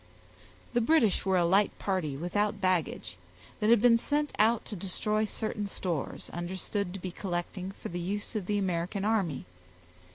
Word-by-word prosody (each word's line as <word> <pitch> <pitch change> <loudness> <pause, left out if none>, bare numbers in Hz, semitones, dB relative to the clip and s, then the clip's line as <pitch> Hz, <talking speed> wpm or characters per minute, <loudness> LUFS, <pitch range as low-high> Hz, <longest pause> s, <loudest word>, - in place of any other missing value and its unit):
The 240 - +3
British 230 - +3
were 190 -1 +4
a 175 - +4
light 195 +4 +3
party 180 -8 -1
without 205 +6 0
baggage, 175 - 0 0.4
that 210 - +2
had 235 -1 +7
been 230 -1 +7
sent 295 +4 0
out 220 +2 +4
to 210 - -5
destroy 210 +3 0
certain 210 -1 -3
stores, 175 -7 -3
understood 180 +2 -3
to - - -5
be 185 0 -5
collecting 185 +1 -4
for - - -7
the 175 - -4
use 205 +6 -3
of 200 -4 -2
the 210 - +1
American 190 +1 -1
army. 190 - 0
195 Hz, 165 wpm, -30 LUFS, 175-215 Hz, 0.4 s, had